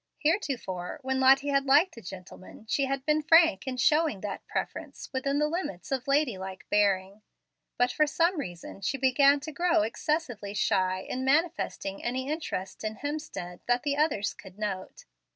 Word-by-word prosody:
Heretofore, 270 - -1
when 265 0 0
Lottie 270 +2 +5
had 275 0 +1
liked 300 +7 +5
a 230 - -10
gentleman, 185 +2 -11
she 275 +5 +1
had 270 0 -3
been 305 +1 +2
frank 320 - +5
in 255 -1 -3
showing 300 - +2
that 205 -2 -6
preference - - -5
within 275 +2 0
the 300 +1 +2
limits 300 - -4
of 260 -1 -2
lady 275 -7 +2
like 190 0 -8
bearing. 200 0 +1 0.6
But, 245 0 +3
for 305 +3 +2
some 335 +3 +1
reason, 175 -4 -7
she 235 +8 -1
began 275 +2 +4
to 310 +2 -6
grow 340 +1 +2
excessively 240 -6 -2
shy 185 -2 +1
in 255 +6 -4
manifesting 290 - 0
any 260 +3 -2
interest 195 - -4
in 215 0 -3
Hemstead 285 - -5
that 245 0 +2
the 285 -2 0
others 285 -10 +1
could 190 -1 -14
note. 195 -3 -5
265 Hz, 170 wpm, -28 LUFS, 200-300 Hz, 0.6 s, Lottie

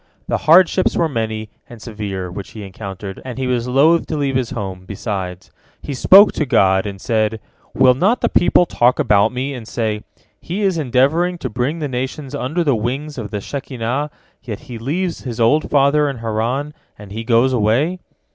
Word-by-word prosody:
The - - 0
hardships 185 +2 +5
were 165 - +2
many 110 -5 -3 0.2
and 120 - -11
severe 100 -5 -5
which 95 +2 -8
he 110 - -8
encountered, 95 0 -8
and 130 -2 -7
he 130 - -2
was 125 -1 -1
loth 150 +7 +3
to 155 - -3
leave 140 -2 -1
his 130 -3 0
home, 95 -4 -5
besides. 95 -3 -5 0.3
He 145 - -4
spoke 195 - +7
to 155 - -2
God, 95 -3 +3
and 100 -1 -7
said, 110 +1 0 0.4
"Will 130 -1 +5
not 195 - +1
the - - +2
people 175 0 +3
talk 125 -6 +2
about 100 -1 +3
me, 130 +3 -3
and 120 -4 -8
say, 110 -3 -2 0.4
'He 195 +5 -4
is 190 -4 +1
endeavoring 155 +7 +1
to - - -5
bring 130 +6 -1
the 155 -3 -3
nations 130 +2 -4
under 145 +5 -1
the 145 -4 +2
wings 135 +6 -3
of 105 -3 -5
the 105 -1 -4
Shekinah, 130 +2 -3 0.3
yet 110 -5 -7
he 120 -2 -9
leaves 170 +9 -2
his 120 -3 -6
old 145 +7 +2
father 145 +1 +3
in 135 - -5
Haran, 115 +6 -2 0.2
and 105 -1 -12
he 110 +2 -5
goes 120 +3 +3
away.'" 125 - +1
125 Hz, 190 wpm, -19 LUFS, 110-145 Hz, 0.4 s, spoke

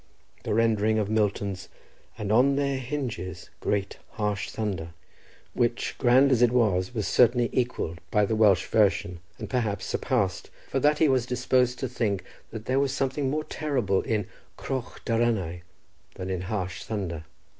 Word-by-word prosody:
The - - -1
rendering 110 -1 +2
of 105 -1 0
Milton's 100 -3 -1 0.5
"And 105 -1 -3
on 130 +5 +5
their 140 -1 0
hinges 120 -10 -5
grate 100 -1 -2
Harsh 105 -2 -2
thunder," 90 -7 -4 0.6
which, 120 0 0
grand 130 +3 +5
as 125 -2 +3
it 120 -1 +5
was, 105 -3 +1
was 110 -3 -1
certainly 120 -1 +4
equalled 105 -9 -1
by 105 -1 +3
the 110 - -1
Welsh 105 -4 +4
version, 95 -4 +1 0.2
and - - -6
perhaps 110 -6 -1
surpassed, 105 -9 -1 0.2
for 135 - 0
that 150 +3 +3
he 160 - +4
was 130 -3 +2
disposed 125 0 +1
to 130 - -2
think 110 -6 -1 0.3
that 110 0 -8
there 130 +3 +1
was 140 -1 +1
something 135 0 -1
more 155 +3 -1
terrible 125 -13 0
in 105 -3 -1 0.3
"croch 130 -3 -5
daranau" 110 -7 0 0.5
than 95 0 -5
in 90 -2 -2
"harsh 95 -2 -3
thunder." 90 -7 -4
110 Hz, 155 wpm, -27 LUFS, 100-125 Hz, 0.6 s, on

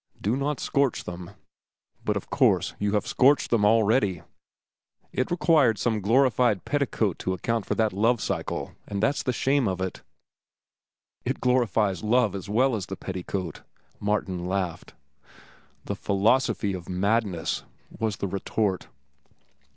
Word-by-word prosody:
Do 105 +5 0
not 140 +1 -1
scorch 140 -3 0
them. 90 0 -7 0.7
But - - 0
of - - -8
course - - +3
you 105 0 0
have 105 - +1
scorched 140 +2 +3
them 115 -3 +3
already. 105 -4 +3 0.9
It 130 - 0
required 155 - +3
some 110 0 0
glorified 120 -1 +3
petticoat 125 - 0
to 95 - -1
account 115 +4 -2
for - - 0
that 110 -3 +1
'Love 115 +4 +2
cycle,' - - -3 0.2
and 100 0 -3
that's 140 +6 +2
the 125 - 0
shame 135 +1 +1
of 95 -1 -2
it." 95 0 -4 1.2
"It - - -2
glorifies 110 -7 +1
love 115 0 +3
as 100 0 -6
well 125 +4 +3
as 100 -3 -4
the 95 - -6
petticoat," 95 -2 -5 0.4
Martin 95 -4 -1
laughed. 95 -3 -3 0.9
"The - - -3
philosophy 100 0 +1
of 90 -1 -7
madness," 95 -1 0 0.4
was 110 -3 -1
the 100 - -2
retort. 100 0 -1
105 Hz, 140 wpm, -26 LUFS, 95-125 Hz, 1.2 s, course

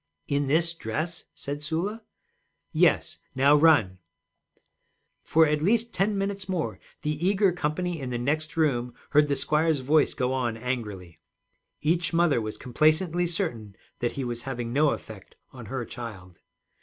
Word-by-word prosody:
'In 140 0 0
this 165 +4 +2
dress?' 160 +4 -4
said 145 +1 -5
Sula. 175 +10 -2 0.7
'Yes, - - +2 0.2
now 140 +3 +5
run.' 145 - +4 1.2
For 160 0 +4
at 150 -1 +1
least 230 +6 +2
ten 200 +2 +1
minutes 195 -1 -3
more 180 -4 -2 0.2
the 150 +1 -2
eager 195 +1 +3
company 175 +1 -2
in 130 - -4
the 120 - -2
next 155 +6 -1
room 125 -6 +1 0.2
heard 150 +1 +5
the 140 - +1
squire's 155 0 +1
voice 150 +3 +3
go 125 +1 0
on 120 -4 -1
angrily. 105 -9 -5 0.6
Each 170 +3 +1
mother 165 -7 +3
was 110 0 -5
complacently 155 +6 +2
certain 120 - -3 0.2
that 120 - -1
he 135 - -3
was 120 -1 -3
having 120 -3 -4
no 150 +2 +4
effect 105 -7 -7 0.2
on 120 -4 -10
her 130 0 -3
child. 105 -8 -9
150 Hz, 150 wpm, -26 LUFS, 120-165 Hz, 1.2 s, now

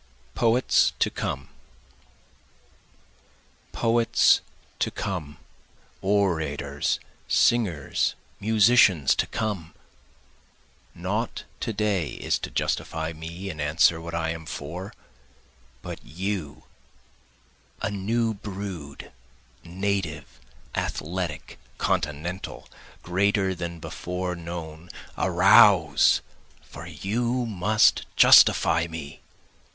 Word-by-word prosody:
Poets 120 +2 +3
to - - +1
Come - - -4 2.2
Poets 115 0 +3 0.4
to - - +1
come! 75 -7 -5 0.6
orators, 80 -8 0 0.3
singers, 95 - +1 0.2
musicians 105 - +4
to - - -1
come! 95 -7 -4 1.2
Not - - -3 0.2
to - - -2
day 100 -6 -1
is - - -1
to - - -5
justify 80 0 -2
me 85 +5 -7
and 80 -2 -7
answer 80 +2 +3
what 85 0 -6
I 80 -1 -1
am 80 -1 -7
for, 90 +8 -6 0.9
But - - -7
you, 90 -2 -5 1.2
a - - 0
new 110 +3 0
brood, 95 -8 -7 0.5
native, 85 -7 -3 0.3
athletic, 85 -1 -4 0.2
continental, 80 +6 -3 0.4
greater 95 +2 +1
than 85 -1 -6
before 90 +3 -4
known, 85 -1 -8 0.3
Arouse! 90 -4 +5 0.4
for 85 - -11
you 115 +9 -2
must 105 0 +2
justify 85 0 +6
me. 80 -3 -8
90 Hz, 85 wpm, -25 LUFS, 80-100 Hz, 2.2 s, justify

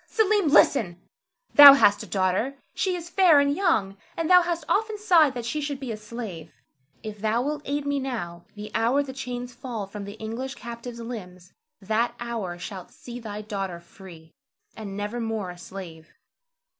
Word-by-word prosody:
Selim, 420 -4 +2
listen! 210 -11 +4 0.5
Thou 285 -1 +12
hast 205 -7 +4
a - - -8
daughter; 195 +8 0 0.2
she 375 -2 -1
is 345 -1 -7
fair 345 -4 +5
and 285 0 +2
young, 220 - +1 0.2
and 330 - -1
thou 360 0 +8
hast 340 -2 -2
often 435 +1 0
sighed 340 -10 +4
that 240 -2 -5
she 300 +6 -2
should 285 -2 -4
be 265 -4 -5
a - - -3
slave. 210 -7 -8 0.5
If 215 -1 -7
thou 220 +3 0
wilt 295 +1 -3
aid 285 +1 -2
me 285 0 0
now, 195 -11 -5
the 210 0 -8
hour 240 +6 +2
the 265 -2 -8
chains 250 -1 -6
fall 235 -6 -6
from 200 +1 -8
the 200 - -8
English 230 +5 -5
captive's 235 0 -8
limbs, 185 -7 -9 0.3
that 220 +4 0
hour 225 -7 -4
shalt 185 0 -8
see 245 0 -10
thy 210 -2 -7
daughter 195 -5 -4
free, 170 -2 -15 0.4
and 200 -3 -7
never 210 +4 -4
more 220 -5 -3
a 175 - -12
slave. 170 -4 -10
235 Hz, 180 wpm, -25 LUFS, 200-280 Hz, 0.5 s, Thou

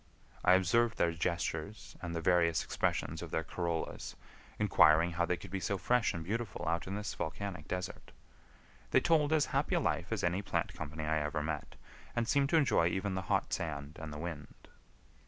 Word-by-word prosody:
I 90 - +6
observed 110 +6 +3
their 85 - +3
gestures 85 +3 -3
and 85 -1 -4
the 85 - -2
various 85 -3 +3
expressions - - -1
of - - -6
their 80 - -1
corollas, 85 0 -3 0.4
inquiring 85 -5 +5
how 85 0 0
they 90 - +1
could 90 +1 -11
be 95 - -2
so 95 +2 -1
fresh 125 +4 +2
and 85 - -5
beautiful 110 +1 -3
out 85 +1 0
in 95 - -3
this 105 +1 -3
volcanic 90 +5 -4
desert. 90 0 -5 0.8
They - - +5
told 155 -3 +3
as 155 -2 +4
happy - - +1
a - - +3
life - - -1
as - - -1
any 90 +3 +1
plant 100 - -1
company 80 +1 -5
I 80 0 +1
ever 75 0 -2
met, 75 -2 -4 0.4
and 120 -1 0
seemed 140 +1 +3
to 165 - +4
enjoy 135 - +4
even 95 +2 -1
the 95 - -1
hot - - +1
sand 75 -2 -4
and 80 -1 -6
the 75 - -6
wind. 75 -2 -7
85 Hz, 190 wpm, -33 LUFS, 80-100 Hz, 0.8 s, I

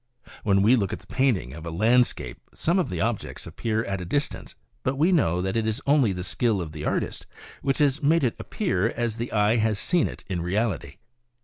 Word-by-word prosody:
When 100 -1 +3
we 115 +5 +6
look 100 -6 0
at - - -4
the - - -20
painting 120 - 0
of 80 +2 -9
a 85 - -5
landscape 110 - +2 0.2
some 175 +4 +1
of 180 - 0
the 90 - -3
objects 115 +2 -2
appear 110 -1 -2
at 95 -1 -3
a - - -4
distance; 145 - -2 0.3
but 130 - -1
we 160 +7 +3
know 90 - +2
that 95 +2 -2
it 110 -1 +1
is 110 0 0
only 140 -6 +4
the 90 -1 -4
skill 110 +2 0
of 85 -4 -4
the 75 -1 -6
artist - - -2 0.3
which 135 - 0
has 145 0 +2
made 160 +2 +3
it 120 - +1
appear 110 - 0
as 115 -2 -2
the 120 +1 -4
eye 105 +1 +3
has 110 -2 +1
seen 175 - +1
it - - -9
in 90 -3 -2
reality. 95 -4 -1
110 Hz, 220 wpm, -25 LUFS, 95-130 Hz, 0.3 s, we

